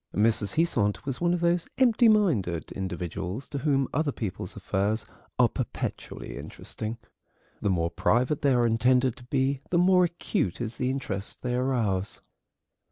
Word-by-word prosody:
Mrs. 105 -1 +2
Heasant 130 -11 +1
was 135 +1 -4
one 175 0 +3
of 175 -1 0
those 170 0 +2
empty 240 -2 +5
minded 125 - +2
individuals 95 - -4
to 140 - -3
whom 135 -2 +2
other 145 0 +1
people's 105 -8 -4
affairs 105 +3 -1 0.3
are - - +6
perpetually - - -5
interesting. 110 +2 -6 0.6
The 105 - +1
more 85 -3 +1
private 120 - +1
they 140 -2 +3
are 120 -1 +3
intended 125 +2 +3
to 125 - -11
be 135 +1 0
the 175 - +2
more 180 0 +5
acute 165 - -2
is 115 -1 -4
the 125 -2 0
interest 105 -7 -3
they 125 -1 -1
arouse. 115 -7 0
125 Hz, 155 wpm, -27 LUFS, 100-145 Hz, 0.6 s, are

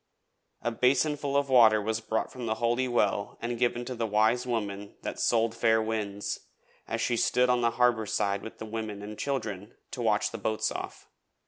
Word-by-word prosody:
A 120 - 0
basinful 140 +3 +1
of 140 0 +1
water 115 -5 +6
was 110 +2 -2
brought 110 0 -2
from 125 -2 -6
the 110 - 0
Holy 120 +3 +1
Well 105 -4 0
and 120 0 -3
given 120 0 +1
to 130 - -4
the 115 -2 -2
Wise 110 +4 +2
Woman 100 -4 -3
that - - -4
sold 115 -1 +2
fair 115 -1 +3
winds, 105 -2 -3 0.5
as - - -2
she 120 - +1
stood 125 +2 +3
on 125 -1 +2
the 120 - +3
harbour 120 -3 +3
side 100 0 0
with 110 - -9
the - - -7
women 110 -2 -5
and 105 +1 -7
children 105 -7 -4 0.2
to - - -5
watch - - +1
the - - -6
boats 110 0 -1
off. - - -7
115 Hz, 195 wpm, -28 LUFS, 110-125 Hz, 0.5 s, water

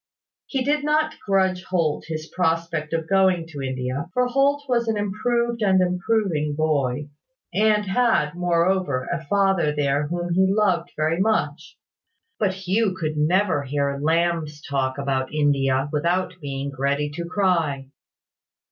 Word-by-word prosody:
He 265 -2 -1
did 295 +2 +1
not 310 +1 0
grudge 190 -2 +1
Holt 165 -5 -1
his 155 -1 -4
prospect 165 -3 -1
of 165 -1 -2
going 190 -3 +3
to 145 -3 -7
India; 130 +4 -3
for 250 0 +3
Holt 275 +3 +2
was 235 -2 +1
an 220 -1 0
improved 235 +3 -1
and 190 -3 +4
improving 180 -4 0
boy, 145 -3 0 0.4
and 210 +2 +3
had, 190 -8 +2
moreover, 175 -5 0
a 170 -1 -4
father 195 -6 +2
there 145 0 +1
whom 175 +1 -2
he 190 +2 +3
loved 195 -5 +1
very 155 +2 0
much: 160 -7 -1 0.6
but 195 -3 +1
Hugh 190 +2 0
could 155 -2 -2
never 170 +1 +2
hear 140 0 -2
Lamb's 160 -1 0
talk 135 -2 -1
about 135 -2 -1
India 135 -3 +1
without 175 +4 0
being 140 -1 -4
ready 140 +2 0
to 170 +3 -5
cry. 170 -8 0
170 Hz, 140 wpm, -23 LUFS, 150-195 Hz, 0.6 s, and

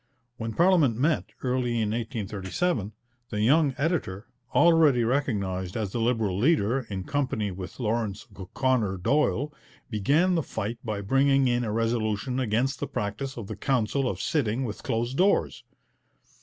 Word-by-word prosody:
When 115 0 -4
parliament 165 - +4
met, 150 +5 +1 0.2
early 125 -1 0
in 105 -1 0
1837, 110 - -2 0.4
the 105 -1 -2
young 140 +4 +3
editor, 140 - -1 0.3
already 160 -7 +5
recognized 100 -8 -1
as 105 -4 -2
the 120 - -2
Liberal 115 -5 0
leader, 125 -3 +2
in 95 -2 -4
company 130 -6 -1
with 95 +5 -8
Laurence 110 -3 -2
O'Connor 105 +1 0
Doyle, 145 +6 +1 0.4
began 145 - +2
the 170 - +2
fight 115 -3 -4
by 105 -3 -3
bringing 135 +5 +3
in 120 0 +1
a 110 - -2
resolution 115 +2 -1
against 130 +3 0
the - - -3
practice 110 +7 -4
of 115 - -5
the 110 - -6
Council 130 +2 0
of 95 - -4
sitting 125 -1 0
with 110 - -6
closed 120 +4 -2
doors. 195 +3 +2
120 Hz, 145 wpm, -27 LUFS, 105-135 Hz, 0.4 s, already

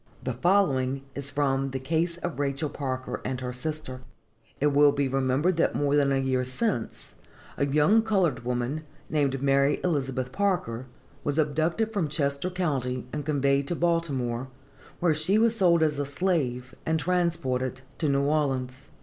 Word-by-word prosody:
The 130 - -2
following 135 -4 +2
is 140 0 -3
from 135 -2 0
THE 130 0 -3
CASE 165 +5 -1
OF 175 -4 -3
RACHEL 140 +1 -1
PARKER 130 -3 -4
AND 130 -1 -3
HER 125 -1 -4
SISTER.... 130 -1 -4 0.6
It 145 0 +2
will 145 0 +6
be 140 -1 0
remembered 135 +6 +1
that 165 - +2
more 145 0 +2
than 140 -1 +3
a 135 - +2
year 130 -1 +1
since 130 - -3 0.4
a 140 - 0
young 150 +10 +4
colored 195 - +1
woman, 125 +5 -2 0.3
named 140 -3 +1
Mary 140 +1 +3
Elizabeth 135 -6 -1
Parker, 130 - -1 0.4
was 145 0 -1
abducted 160 +9 +1
from 190 -7 0
Chester 140 +2 0
county 135 -9 -2
and 150 -1 -4
conveyed 140 -1 +2
to 175 - -1
Baltimore, 140 -8 0 0.5
where 170 -2 +3
she 160 +7 +1
was 230 +1 +3
sold 170 -4 +4
as 150 -2 +1
a 145 - 0
slave, 140 -6 -1
and 160 0 0
transported 150 -8 0 0.2
to 155 - +1
New 140 0 +2
Orleans. 135 -3 -1
140 Hz, 160 wpm, -27 LUFS, 130-165 Hz, 0.6 s, will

